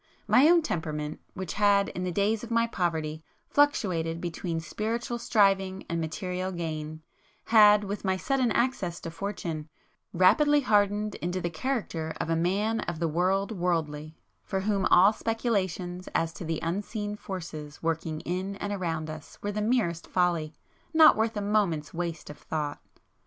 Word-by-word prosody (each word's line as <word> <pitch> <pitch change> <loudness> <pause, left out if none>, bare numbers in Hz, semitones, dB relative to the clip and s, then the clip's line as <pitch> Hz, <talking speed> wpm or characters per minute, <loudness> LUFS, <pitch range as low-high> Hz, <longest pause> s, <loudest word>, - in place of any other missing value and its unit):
My 285 +5 +6
own 340 -1 +5
temperament, 155 - -3 0.2
which 190 -2 -4
had, 200 -1 +3
in 180 - -5
the 180 - -1
days 205 +4 +1
of 235 - -7
my 230 0 +3
poverty, 160 -7 -2 0.2
fluctuated 180 - +1
between 170 -1 -3
spiritual 225 +8 -3
striving 195 -4 +2
and 170 -1 -2
material 180 +3 -3
gain, 155 -2 -5 0.4
had, 210 -2 +7
with 205 +1 -4
my 190 -1 +1
sudden 260 +2 +1
access 200 -8 0
to 165 - -6
fortune, 165 -4 -5 0.4
rapidly 290 - +4
hardened 210 -2 +2
into 180 +2 -2
the 175 -1 -3
character 170 -6 -3
of 165 - -2
a - - +3
man 200 +7 +1
of 160 - -3
the 165 +1 0
world 185 +6 +1
worldly, 160 -5 -2 0.3
for 190 - -2
whom 200 -1 +1
all 195 +4 +6
speculations 190 -6 -2
as 165 0 +1
to - - -8
the 160 -1 -2
unseen 205 +4 -3
forces 160 -8 -7
working 160 -1 -2
in 185 +3 -3
and 205 +1 -4
around 165 -5 -2
us, 155 -1 -9
were 205 - -1
the 210 +1 -2
merest 210 -8 0
folly, 175 -4 +1 0.4
not 315 -1 +8
worth 220 0 0
a - - -1
moment's 200 -8 0
waste 170 -3 -4
of 150 - -13
thought. 150 -2 -4
185 Hz, 160 wpm, -28 LUFS, 165-210 Hz, 0.4 s, not